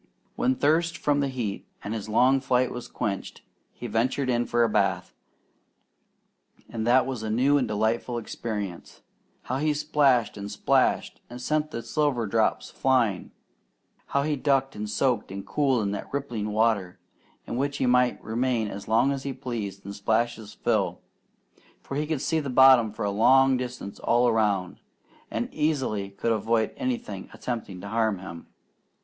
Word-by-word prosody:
When 130 +1 +1
thirst 165 +5 +2
from 145 -1 +1
the 140 - +1
heat 120 -7 -4 0.2
and 105 - -4
his 110 -1 -5
long 130 +5 +4
flight 130 -1 +1
was 125 - -6
quenched, 100 -2 -4 0.3
he - - -10
ventured 125 +4 0
in 120 0 0
for 120 0 +2
a - - +4
bath, 95 -4 0 1.5
and 115 -1 -4
that 130 +2 +5
was 130 -4 -4
a 110 - -4
new 135 +6 +3
and 125 - 0
delightful 110 +3 -1
experience. 105 -5 -6 0.4
How 130 - -2
he 150 0 +1
splashed 145 -5 +2
and 100 0 -6
splashed, 100 - +1
and 120 +1 -8
sent 150 +4 0
the 115 -6 -5
silver 145 -7 0
drops 110 +2 0
flying! 120 -8 +1 0.8
How 140 - +1
he 150 0 0
ducked 135 -1 +1
and 105 0 -4
soaked 115 -1 0
and 100 0 -6
cooled 130 0 +1
in 100 - -1
that 100 - -5
rippling 120 -7 -3
water, 105 -4 +1 0.5
in - - -5
which 140 +3 -1
he - - 0
might 125 0 +3
remain 115 -1 0
as 100 0 -8
long 115 +5 +3
as 135 -1 -3
he 135 0 -4
pleased 115 -7 -5
and 100 - -6
splash 110 +3 0
his 110 -2 -11
fill; - - 0 0.8
for 135 - -6
he 150 +1 -1
could 155 -4 -2
see 160 -2 +1
the 145 -3 -4
bottom 130 -3 +6
for 105 - -4
a 100 - 0
long 130 +6 +5
distance 125 -5 -5
all 120 +1 +3
around, 105 -5 +1 0.5
and - - -2
easily 130 -10 -1
could 100 +4 -2
avoid 110 0 +1
anything 115 -6 -4
attempting 115 -7 -5
to - - -7
harm 110 -2 +1
him. 90 -3 -9
120 Hz, 170 wpm, -26 LUFS, 105-135 Hz, 1.5 s, bottom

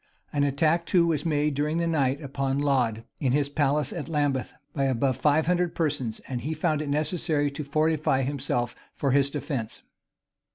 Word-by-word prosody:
[] - - -39
An 145 -1 +2
attack 155 +4 +1
too 175 -2 +4
was 160 -2 0
made 150 -1 +1
during 150 +3 0
the 170 - +1
night 145 -3 +1
upon 135 -1 -1
Laud, 125 -6 +1 0.2
in 130 -3 +1
his 140 0 +1
palace 145 -1 +1
of 165 -2 -5
Lambeth, 145 -4 0 0.2
by 140 -2 0
above 130 0 +1
five 150 +4 +2
hundred 180 0 +1
persons; 140 -8 -1
and 125 -2 -3
he 155 +6 -3
found 155 -1 0
it 150 - -4
necessary 150 -1 +1
to 150 +2 -5
fortify 155 -2 +1
himself 125 -3 -2 0.2
for 140 - 0
his 140 +1 +3
defence. 140 -6 -4
145 Hz, 180 wpm, -26 LUFS, 135-155 Hz, 0.2 s, too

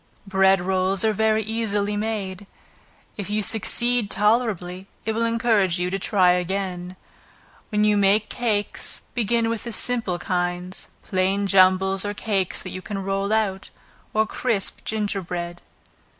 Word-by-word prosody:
Bread 195 -1 +4
rolls 190 +2 +2
are 220 - +3
very 220 +1 +2
easily 210 -2 -1
made. 205 -3 -3 0.7
If 200 -2 -5
you 210 0 +1
succeed 235 +1 +1
tolerably, 200 -4 0 0.2
it 220 - 0
will 230 +1 +1
encourage 225 -6 +2
you 180 0 -1
to 195 - -1
try 185 -2 +3
again. 180 0 -2 0.7
When 210 0 +1
you 210 -1 +4
make 200 +2 +3
cakes, 215 -4 -1
begin 230 0 +1
with 230 -1 -2
the 235 - -4
simple 230 -6 -1
kinds; 175 +1 -3 0.2
plain 190 +1 0
jumbles 190 0 +4
or 205 0 -3
cakes 195 -4 -1
that 185 - -6
you 185 - -6
can 200 +2 -5
roll 195 +1 -1
out, 205 -3 0 0.4
or 220 0 +2
crisp 215 -3 -1
ginger 210 -2 -1
bread. 175 -1 -5
200 Hz, 145 wpm, -23 LUFS, 185-220 Hz, 0.7 s, Bread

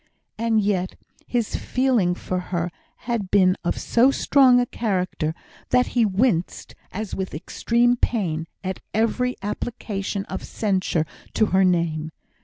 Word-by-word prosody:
And 225 0 +1
yet 195 -3 0 0.3
his 235 -3 -1
feeling 245 -9 +1
for 185 0 -3
her 175 -1 -1 0.3
had 230 -5 -2
been 185 -2 +4
of 175 - -1
so 240 +3 +4
strong 265 -2 +5
a 245 - +2
character, 185 -9 -2 0.3
that 250 0 +3
he 235 -3 +4
winced, 195 -3 0 0.2
as 215 0 -5
with 190 -4 -3
extreme 235 +9 +1
pain, 170 -10 -1 0.2
at 190 -1 -3 0.2
every 250 +3 +1
application 200 -2 -3
of - - -6
censure 185 -6 0 0.3
to 220 - +4
her 190 0 +5
name. 165 -3 +1
200 Hz, 135 wpm, -23 LUFS, 180-235 Hz, 0.3 s, strong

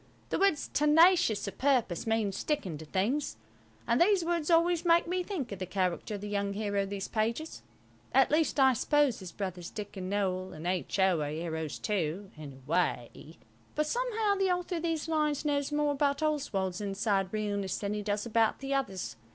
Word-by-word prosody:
The - - -1
words 390 -7 +2
"tenacious 300 - +4
of 200 - -7
purpose" 245 -8 +1
mean 225 -2 +1
sticking 200 - -2
to 160 - -9
things, 215 - -1 0.5
and - - +2
these 375 -1 +4
words 335 -2 -1
always 340 0 +3
make 340 -1 +4
me 360 +2 -1
think 350 - -4
of 200 - -6
the 185 - -4
character 185 +3 -1
of 200 - -7
the 205 - -5
young 200 -1 -1
hero 205 -1 -1
of 195 - -3
these 195 -1 -4
pages. 230 +8 -2 0.5
At 270 0 +4
least 305 -1 +2
I 265 -1 +6
suppose 290 0 +2
his 185 -3 -8
brothers 180 -2 -5
Dick 210 -1 -7
and 185 0 -5
Noël 185 -2 -1
and 155 +2 -8
H.O. 185 -1 +1
are 145 - -2
heroes 160 0 -4
too, 190 -1 -2
in 150 -2 -9
a 130 0 -16
way, 160 -2 -2 0.4
but 305 - +1
somehow 450 +1 0
the 390 -1 +1
author 360 0 -1
of - - -4
these 325 -2 -2
lines 300 -2 0
knows 285 -1 0
more 295 0 +1
about 285 +1 0
Oswald's 205 -12 -1
inside 195 -1 0
realness 205 -3 -2
than 205 0 -2
he 210 - -2
does 205 +1 -2
about 225 -1 +2
the 275 0 -3
others. 195 - -2
215 Hz, 190 wpm, -30 LUFS, 190-300 Hz, 0.5 s, I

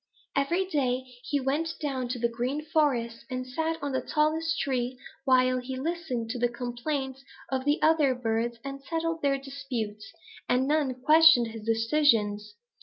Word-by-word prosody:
Every 340 +7 +1
day 260 -7 0 0.2
he 290 - 0
went 295 +5 -1
down 270 -5 -2
to 250 +1 -3
the 235 0 +1
Green 250 +6 -3
Forest 245 -8 +1
and 255 -1 -3
sat 320 +6 -2
on 285 - -1
the 260 - 0
tallest 320 +1 0
tree 255 -2 -1 0.3
while 255 -1 +4
he 260 +1 -5
listened 265 -7 -3
to 250 - -4
the 240 0 +2
complaints 260 +3 -4 0.3
of 260 0 -1
the 290 +1 +2
other 305 -5 +4
birds 235 0 -1
and 275 0 -6
settled 330 +2 -2
their 275 -1 +2
disputes, 255 -6 -5 0.4
and 255 +2 +2
none 290 -3 +1
questioned 310 -6 +7
his 225 -1 -8
decisions. 225 -4 +2
265 Hz, 160 wpm, -28 LUFS, 240-300 Hz, 0.4 s, questioned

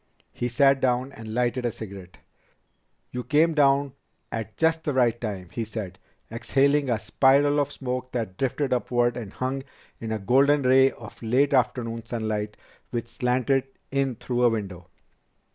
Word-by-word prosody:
He 120 - -2
sat 135 +2 +3
down 125 +1 +1
and 115 -5 -9
lighted 125 +1 0
a 120 - 0
cigarette. 100 -5 -10 0.9
"You 125 0 -4
came 150 +7 +3
to 150 - +3
town 140 -1 +3 0.4
at 110 -2 -5
just 160 0 +2
the 145 - -2
right 120 -2 +2
time," 100 -6 -5
he 115 - -3
said, 105 -4 -6 0.3
exhaling 140 +4 +2
a 120 - +2
spiral 140 +5 +3
of 145 0 0
smoke 130 -1 -4
that 110 -6 -3
drifted 135 +3 -1
upward 120 -1 +1
and 110 -5 -6
hung 130 +1 -3 0.4
in 115 -1 -5
a 110 - 0
golden 135 +7 +3
ray 130 +1 +6
of 110 -5 -12
late 130 +5 +2
afternoon 115 -3 0
sunlight 110 -3 -3 0.3
which 120 -1 -4
slanted 125 +3 +1 0.3
in 135 -2 0
through 120 +2 -2
a 120 - +6
window. 95 -6 -4
125 Hz, 160 wpm, -25 LUFS, 115-135 Hz, 0.9 s, ray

